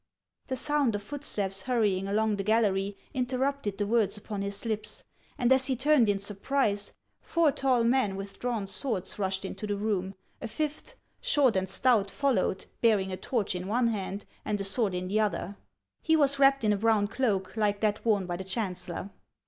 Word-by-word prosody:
The 260 Hz, -, -2 dB
sound 285 Hz, -4 st, +1 dB
of 205 Hz, -, -4 dB
footsteps 205 Hz, -7 st, -2 dB
hurrying 210 Hz, -7 st, +1 dB
along 215 Hz, +1 st, +1 dB
the 195 Hz, -, -2 dB
gallery 200 Hz, -2 st, +1 dB, 0.2 s
inter 255 Hz, -1 st, -1 dB
rupted 265 Hz, -6 st, -1 dB
the 205 Hz, -, 0 dB
words 215 Hz, -2 st, +1 dB
upon 205 Hz, -1 st, -5 dB
his 200 Hz, +2 st, -2 dB
lips; 215 Hz, -2 st, -2 dB, 0.3 s
and 245 Hz, 0 st, +2 dB
as 265 Hz, 0 st, +3 dB
he 265 Hz, -, +1 dB
turned 260 Hz, -3 st, +4 dB
in 200 Hz, -, +2 dB
sur 200 Hz, +1 st, -2 dB
prise, 205 Hz, -2 st, 0 dB, 0.3 s
four 335 Hz, -3 st, +2 dB
tall 260 Hz, -4 st, +2 dB
men, 235 Hz, -4 st, +2 dB
with 195 Hz, 0 st, -7 dB
drawn 235 Hz, -5 st, -1 dB
swords, 200 Hz, -2 st, -2 dB
rushed 190 Hz, 0 st, -1 dB
into 195 Hz, +2 st, -5 dB
the 205 Hz, -, -1 dB
room; 200 Hz, -2 st, -1 dB, 0.3 s
a -, -, -3 dB
fifth, 305 Hz, -, -4 dB, 0.3 s
short 290 Hz, -, +3 dB
and 190 Hz, 0 st, 0 dB
stout, 220 Hz, -2 st, +2 dB
followed, 235 Hz, -7 st, 0 dB, 0.2 s
bearing 205 Hz, -5 st, +3 dB
a -, -, -2 dB
torch 205 Hz, +2 st, -1 dB
in 180 Hz, +1 st, -4 dB
one 235 Hz, +3 st, +2 dB
hand 200 Hz, -2 st, -4 dB, 0.2 s
and 210 Hz, -1 st, -1 dB
a -, -, -2 dB
sword 195 Hz, -1 st, +1 dB
in 180 Hz, 0 st, -3 dB
the 205 Hz, +3 st, +1 dB
other. 205 Hz, -2 st, -1 dB, 0.5 s
He 320 Hz, -, +3 dB
was 280 Hz, -2 st, +3 dB
wrapped 275 Hz, -2 st, +5 dB
in 210 Hz, -1 st, +3 dB
a -, -, 0 dB
brown 220 Hz, -1 st, +3 dB
cloak, 210 Hz, -5 st, -1 dB
like 205 Hz, -2 st, +1 dB
that 215 Hz, -1 st, 0 dB
worn 210 Hz, -4 st, +2 dB
by 175 Hz, -1 st, -3 dB
the 190 Hz, -, -5 dB
chancellor. 185 Hz, -2 st, -4 dB
210 Hz, 195 wpm, -29 LUFS, 195-250 Hz, 0.5 s, wrapped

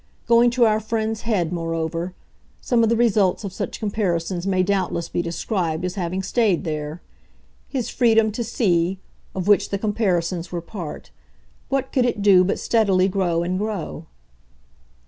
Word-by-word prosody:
Going 235 Hz, +1 st, +5 dB
to 240 Hz, -, +6 dB
our 215 Hz, -1 st, +3 dB
friend's 220 Hz, 0 st, -2 dB
head, 180 Hz, -6 st, +1 dB
moreover, 165 Hz, +1 st, -3 dB, 0.4 s
some 240 Hz, -2 st, +1 dB
of 225 Hz, -, +3 dB
the 230 Hz, -, +3 dB
results 215 Hz, -5 st, +2 dB
of 195 Hz, -3 st, -5 dB
such -, -, -4 dB
comparisons 185 Hz, -4 st, -1 dB
may 185 Hz, -1 st, +2 dB
doubtless 185 Hz, -3 st, -1 dB
be -, -, -1 dB
described 170 Hz, 0 st, -2 dB
as 180 Hz, -, -2 dB
having 185 Hz, -1 st, -3 dB
stayed 210 Hz, -5 st, +1 dB
there. 155 Hz, +1 st, -4 dB, 0.7 s
His 255 Hz, -5 st, -3 dB
freedom 225 Hz, -3 st, +3 dB
to 235 Hz, +3 st, -3 dB
see 190 Hz, -5 st, +1 dB, 0.4 s
of 190 Hz, 0 st, -3 dB
which 205 Hz, -1 st, +4 dB
the 200 Hz, -, -1 dB
comparisons 185 Hz, -5 st, -1 dB
were 175 Hz, -, -2 dB
part 170 Hz, -1 st, -8 dB, 0.6 s
what 270 Hz, 0 st, -1 dB
could 255 Hz, -3 st, +2 dB
it 235 Hz, -4 st, -1 dB
do 190 Hz, -3 st, +6 dB
but 195 Hz, -, 0 dB
steadily 195 Hz, -5 st, +2 dB
grow 180 Hz, -3 st, 0 dB
and 180 Hz, +2 st, -1 dB
grow? 200 Hz, -6 st, -4 dB
190 Hz, 160 wpm, -22 LUFS, 175-220 Hz, 0.7 s, to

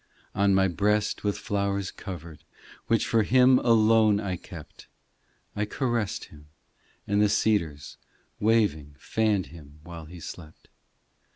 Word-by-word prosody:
On 100 Hz, 0 st, +2 dB
my 95 Hz, 0 st, +3 dB
breast 105 Hz, +3 st, 0 dB
with 105 Hz, -1 st, -1 dB
flowers 100 Hz, -3 st, -2 dB
covered, 85 Hz, -5 st, -9 dB, 0.4 s
Which 115 Hz, -1 st, +2 dB
for 115 Hz, -, +2 dB
Him 125 Hz, +3 st, +5 dB
alone 110 Hz, -2 st, +4 dB
I 100 Hz, -3 st, -3 dB
kept, -, -, -12 dB, 0.7 s
I 105 Hz, -, -1 dB
caressed 120 Hz, -2 st, -2 dB
Him; 75 Hz, 0 st, -16 dB, 0.6 s
and 100 Hz, 0 st, +1 dB
the 105 Hz, -, +4 dB
cedars 100 Hz, -9 st, -1 dB, 0.4 s
Waving 100 Hz, -10 st, +1 dB
fanned 105 Hz, +2 st, 0 dB
Him 75 Hz, -2 st, -14 dB
while 85 Hz, -1 st, -9 dB
He 85 Hz, +3 st, -11 dB
slept. 80 Hz, -1 st, -11 dB
100 Hz, 125 wpm, -26 LUFS, 85-110 Hz, 0.7 s, Him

